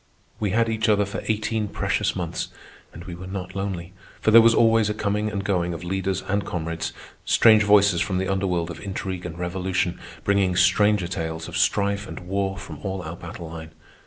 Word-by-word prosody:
We 105 Hz, -, 0 dB
had 115 Hz, +4 st, +2 dB
each 110 Hz, -1 st, 0 dB
other 105 Hz, -1 st, +4 dB
for 100 Hz, -, -5 dB
eighteen 110 Hz, 0 st, 0 dB
precious -, -, -1 dB
months, -, -, -3 dB, 0.4 s
and 85 Hz, -, -10 dB
we 90 Hz, -, -8 dB
were 90 Hz, +2 st, -8 dB
not 95 Hz, -1 st, -6 dB
lonely, 95 Hz, -2 st, -4 dB, 0.3 s
for 110 Hz, -, +2 dB
there 115 Hz, +1 st, +10 dB
was 115 Hz, 0 st, +5 dB
always 115 Hz, -2 st, +4 dB
a 105 Hz, -, -2 dB
coming 105 Hz, 0 st, -1 dB
and 100 Hz, -2 st, -3 dB
going 90 Hz, -3 st, 0 dB
of 85 Hz, -, -8 dB
leaders 95 Hz, +1 st, -2 dB
and 100 Hz, +1 st, 0 dB
comrades—strange 85 Hz, +6 st, +1 dB
voices 100 Hz, -4 st, +5 dB
from 95 Hz, -, 0 dB
the 95 Hz, +1 st, -1 dB
under 95 Hz, 0 st, 0 dB
world 85 Hz, -2 st, -1 dB
of 85 Hz, -, -8 dB
intrigue 95 Hz, -2 st, -4 dB
and 85 Hz, 0 st, -8 dB
revolution, 90 Hz, 0 st, -1 dB, 0.2 s
bringing 100 Hz, -2 st, +2 dB
stranger 95 Hz, +1 st, +3 dB
tales 80 Hz, -2 st, -4 dB
of -, -, -8 dB
strife 100 Hz, 0 st, +1 dB
and -, -, -8 dB
war 95 Hz, +1 st, -2 dB
from 95 Hz, +1 st, -8 dB
all 95 Hz, -2 st, -4 dB
our 85 Hz, +2 st, -6 dB
battle 85 Hz, -1 st, -8 dB
line. 80 Hz, -1 st, -9 dB
95 Hz, 195 wpm, -24 LUFS, 90-105 Hz, 0.4 s, there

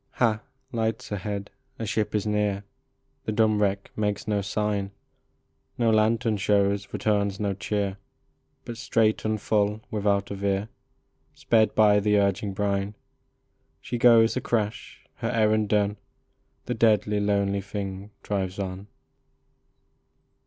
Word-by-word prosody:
Ha! 110 Hz, -3 st, +1 dB, 0.3 s
lights 115 Hz, -2 st, -2 dB
ahead! 100 Hz, 0 st, -4 dB, 0.3 s
A 115 Hz, -, -4 dB
ship 105 Hz, +1 st, -1 dB
is 105 Hz, -, 0 dB
near! 105 Hz, -1 st, 0 dB, 0.6 s
The -, -, -1 dB
dumb 110 Hz, -1 st, +2 dB
wreck 100 Hz, -1 st, 0 dB
makes 105 Hz, -1 st, -2 dB
no 105 Hz, -1 st, +1 dB
sign; 105 Hz, 0 st, -1 dB, 0.9 s
No 115 Hz, -2 st, +3 dB
lantern 110 Hz, 0 st, +2 dB
shows, 100 Hz, 0 st, +1 dB
returns 100 Hz, -2 st, 0 dB
no 100 Hz, -2 st, 0 dB
cheer, 100 Hz, 0 st, -2 dB, 0.7 s
But 115 Hz, -, -6 dB
straight 110 Hz, -3 st, +1 dB
and 110 Hz, 0 st, 0 dB
full, 105 Hz, +1 st, +1 dB
without 100 Hz, -2 st, 0 dB
a -, -, -2 dB
veer, 100 Hz, +1 st, -1 dB, 0.7 s
Sped 110 Hz, -2 st, +2 dB
by 105 Hz, -1 st, +5 dB
the 105 Hz, 0 st, +2 dB
urging 100 Hz, 0 st, +1 dB
brine 100 Hz, +1 st, -1 dB, 0.8 s
She 120 Hz, -, -4 dB
goes 115 Hz, -2 st, +6 dB
a -, -, -1 dB
crash! 105 Hz, -3 st, -3 dB
her -, -, -2 dB
errand 110 Hz, -2 st, +2 dB
done, 105 Hz, -1 st, +1 dB, 0.7 s
The 125 Hz, -, -2 dB
deadly, 105 Hz, -2 st, +3 dB
lonely 100 Hz, -1 st, +1 dB
thing 100 Hz, 0 st, -5 dB
drives 95 Hz, -2 st, -2 dB
on. 95 Hz, 0 st, -5 dB
105 Hz, 130 wpm, -26 LUFS, 100-110 Hz, 0.9 s, goes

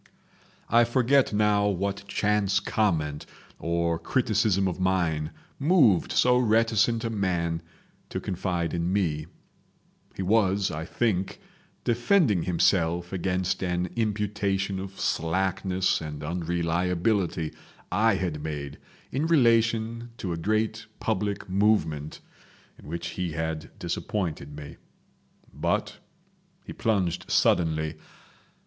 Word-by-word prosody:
I 120 Hz, +1 st, +5 dB
forget 130 Hz, +3 st, +3 dB
now 105 Hz, -1 st, +3 dB
what 100 Hz, +1 st, -2 dB
chance 105 Hz, 0 st, +1 dB
comment 80 Hz, -9 st, -1 dB, 0.3 s
or 85 Hz, 0 st, 0 dB
criticism 105 Hz, -2 st, +1 dB
of 90 Hz, 0 st, -3 dB
mine 85 Hz, -5 st, +1 dB, 0.3 s
moved 140 Hz, -, +4 dB
so 125 Hz, 0 st, +4 dB
reticent 115 Hz, 0 st, +2 dB
a 115 Hz, -, -2 dB
man 85 Hz, -5 st, -1 dB, 0.5 s
to -, -, -3 dB
confide 90 Hz, -3 st, -2 dB
in 85 Hz, +1 st, -1 dB
me. 80 Hz, -6 st, 0 dB, 0.9 s
He 95 Hz, -, -3 dB
was, 100 Hz, -1 st, +2 dB
I 80 Hz, 0 st, -4 dB
think, 95 Hz, -3 st, -1 dB, 0.4 s
defending 120 Hz, -, +3 dB
himself 85 Hz, 0 st, +1 dB
against 90 Hz, 0 st, -1 dB
an 90 Hz, -1 st, -1 dB
imputation 100 Hz, -3 st, -1 dB
of 95 Hz, 0 st, -8 dB
slackness 95 Hz, +2 st, 0 dB
and 75 Hz, -1 st, -6 dB
unreliability 85 Hz, +1 st, 0 dB, 0.4 s
I 105 Hz, +3 st, +3 dB
had 85 Hz, -6 st, -2 dB
made 75 Hz, -2 st, -5 dB, 0.3 s
in 145 Hz, +5 st, 0 dB
relation 115 Hz, -4 st, +2 dB
to 90 Hz, -3 st, -3 dB
a -, -, -2 dB
great 110 Hz, +5 st, -1 dB
public 105 Hz, -1 st, -2 dB
movement 90 Hz, -7 st, +1 dB, 0.6 s
in -, -, -14 dB
which 85 Hz, +2 st, -4 dB
he 90 Hz, -2 st, -3 dB
had 80 Hz, 0 st, -3 dB
disappointed 85 Hz, -4 st, -3 dB
me. 75 Hz, -1 st, -9 dB, 0.8 s
But -, -, -1 dB, 0.7 s
he -, -, -7 dB
plunged 95 Hz, -4 st, -1 dB
suddenly. 80 Hz, -2 st, +2 dB
95 Hz, 110 wpm, -27 LUFS, 85-110 Hz, 0.9 s, I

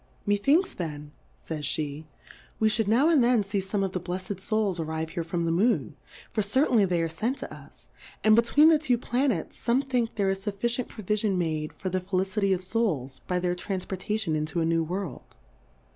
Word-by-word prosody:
Methinks 275 Hz, -, +3 dB
then, 150 Hz, -4 st, -6 dB, 0.3 s
faj's 150 Hz, -3 st, -2 dB
pe, 150 Hz, 0 st, -4 dB, 0.5 s
we 220 Hz, -, +4 dB
fhould 215 Hz, -1 st, +1 dB
now 240 Hz, +8 st, +4 dB
and 305 Hz, -7 st, +5 dB
then 240 Hz, -3 st, +4 dB
fee 200 Hz, 0 st, -2 dB
fome 195 Hz, +1 st, -1 dB
of 190 Hz, -, -1 dB
the 185 Hz, -, -2 dB
bleffcd 185 Hz, +2 st, -5 dB
Souls 205 Hz, -3 st, 0 dB
arrive 160 Hz, 0 st, -3 dB
here 170 Hz, -, -3 dB
from 170 Hz, +1 st, -2 dB
the 165 Hz, -, +1 dB
Moon, 205 Hz, +9 st, +1 dB, 0.4 s
for 215 Hz, -, 0 dB
certainly 225 Hz, +1 st, +3 dB
they 175 Hz, -3 st, +1 dB
are -, -, +1 dB
fent 220 Hz, -, -2 dB
to -, -, -6 dB
lis; -, -, -14 dB, 0.4 s
and 215 Hz, 0 st, +6 dB
between 265 Hz, +7 st, +5 dB
the 315 Hz, -2 st, +5 dB
two 255 Hz, -6 st, +1 dB
Planets, 245 Hz, -, -1 dB
fome 250 Hz, +4 st, +1 dB
think, 245 Hz, -3 st, 0 dB
there 195 Hz, -2 st, +1 dB
is 195 Hz, 0 st, -4 dB
fufficient 235 Hz, +4 st, -1 dB
Provifion 210 Hz, -2 st, -1 dB
made 155 Hz, -3 st, -1 dB
for 190 Hz, -, -4 dB
the 185 Hz, +1 st, -1 dB
Felicity 195 Hz, +2 st, 0 dB
of 185 Hz, -1 st, 0 dB
Souls, 170 Hz, -, -1 dB
by 180 Hz, -, 0 dB
their 180 Hz, 0 st, 0 dB
Tranfpor 185 Hz, +1 st, -4 dB
tation 210 Hz, -3 st, -1 dB
into 155 Hz, +2 st, -1 dB
a 165 Hz, -, +1 dB
new 165 Hz, 0 st, +2 dB
World. 175 Hz, -4 st, -5 dB
195 Hz, 195 wpm, -27 LUFS, 170-225 Hz, 0.5 s, and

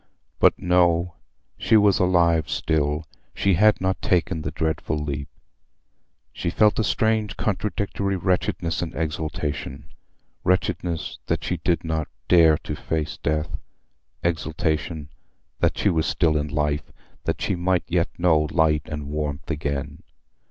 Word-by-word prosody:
But -, -, +5 dB
no: 90 Hz, -1 st, +2 dB, 0.5 s
she 110 Hz, -, +4 dB
was 105 Hz, -2 st, +4 dB
alive 85 Hz, -3 st, +3 dB
still; 75 Hz, 0 st, 0 dB, 0.3 s
she 100 Hz, -, +2 dB
had 105 Hz, +4 st, +4 dB
not 95 Hz, 0 st, -1 dB
taken 85 Hz, -2 st, +1 dB
the -, -, -3 dB
dreadful 80 Hz, -1 st, -2 dB
leap. 70 Hz, -1 st, -3 dB, 1.1 s
She -, -, -2 dB
felt 105 Hz, +5 st, +3 dB
a -, -, +3 dB
strange 110 Hz, 0 st, +1 dB
contradictory 100 Hz, -1 st, -1 dB
wretchedness 90 Hz, -2 st, 0 dB
and 85 Hz, -, -4 dB
exultation: 75 Hz, -3 st, -4 dB, 0.5 s
wretchedness, 90 Hz, -2 st, -1 dB
that -, -, -1 dB
she -, -, -1 dB
did 85 Hz, -, 0 dB
not 80 Hz, -2 st, -2 dB, 0.2 s
dare 80 Hz, -3 st, +6 dB
to -, -, -4 dB
face 75 Hz, -2 st, -3 dB
death; 75 Hz, +1 st, -1 dB, 0.7 s
exultation, 80 Hz, -2 st, -1 dB, 0.5 s
that -, -, +1 dB
she 100 Hz, -, +2 dB
was 80 Hz, -2 st, +1 dB
still 80 Hz, -3 st, +2 dB
in 75 Hz, 0 st, 0 dB
life—that 75 Hz, 0 st, -3 dB
she -, -, 0 dB
might 90 Hz, 0 st, +1 dB
yet 85 Hz, -1 st, +1 dB
know 80 Hz, -3 st, +3 dB
light 80 Hz, -2 st, +3 dB
and 75 Hz, -2 st, -5 dB
warmth 75 Hz, 0 st, -3 dB
again. 70 Hz, -1 st, -3 dB
80 Hz, 130 wpm, -24 LUFS, 75-90 Hz, 1.1 s, dare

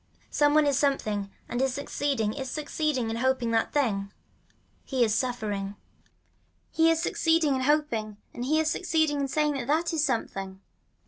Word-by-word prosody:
Some 290 Hz, 0 st, +3 dB
one 305 Hz, -1 st, +5 dB
is 280 Hz, -2 st, +2 dB
something 215 Hz, -8 st, 0 dB, 0.2 s
and 240 Hz, -, -2 dB
is 265 Hz, -1 st, +1 dB
succeeding 280 Hz, -6 st, -1 dB
is 265 Hz, -2 st, -5 dB
succeeding 295 Hz, -4 st, -1 dB
in 225 Hz, -, -3 dB
hoping 255 Hz, -1 st, +1 dB
that 225 Hz, 0 st, +1 dB
thing. 205 Hz, -9 st, 0 dB, 0.7 s
He 260 Hz, -3 st, +1 dB
is 220 Hz, -2 st, +2 dB
suffering. 210 Hz, -5 st, -2 dB, 1.0 s
He 325 Hz, 0 st, +4 dB
is 330 Hz, -1 st, +2 dB
succeeding 325 Hz, -3 st, +2 dB
in 260 Hz, -, -1 dB
hoping 255 Hz, -7 st, 0 dB, 0.2 s
and 240 Hz, -, -5 dB
he 305 Hz, +5 st, +2 dB
is 315 Hz, -, +1 dB
succeeding 315 Hz, -4 st, +1 dB
in 275 Hz, -, 0 dB
saying 300 Hz, +2 st, +1 dB
that 250 Hz, -2 st, -4 dB
that 330 Hz, +4 st, +1 dB
is 310 Hz, -2 st, +1 dB
something. 195 Hz, -8 st, -2 dB
270 Hz, 170 wpm, -27 LUFS, 225-300 Hz, 1.0 s, one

